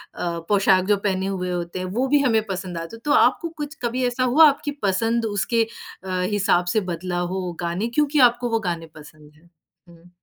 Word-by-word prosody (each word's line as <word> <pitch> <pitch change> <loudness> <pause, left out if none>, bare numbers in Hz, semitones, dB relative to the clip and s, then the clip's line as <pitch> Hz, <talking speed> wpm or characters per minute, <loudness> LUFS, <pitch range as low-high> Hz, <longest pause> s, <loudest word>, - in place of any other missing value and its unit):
अ, 170 -1 -3
पोशाक 195 -2 +4
जो 205 - +4
पहने 190 -1 -1
हुए 180 -2 -3
होते 175 0 -4
हैं, 185 - -3
वो 230 +9 -1
भी 290 +2 +3
हमें 230 -5 +2
पसंद 185 -2 -4
आजा। 165 +7 -7
तो 295 - +1
आपको 335 - +3
कुछ 295 +1 -5
कभी 245 +2 -1
ऐसा 245 +1 -1
हुआ 295 +6 +6
आपकी 290 +1 -3
पसंद 225 +4 +1
उसके 220 +2 0 0.4
अ, 185 -1 -3
हिसाब 195 -3 +2
से - - +5
बदला 175 +1 -3
हो 185 -2 -3
गाने 175 +6 -2
क्योंकि 295 0 +2
आपको 240 +1 -5
वो 225 -1 +1
गाने 165 -1 -4
पसंद 150 0 -15
हैं। 165 +3 -24 0.4
हुँ। 170 +1 -18
195 Hz, 200 wpm, -22 LUFS, 175-240 Hz, 0.4 s, हुआ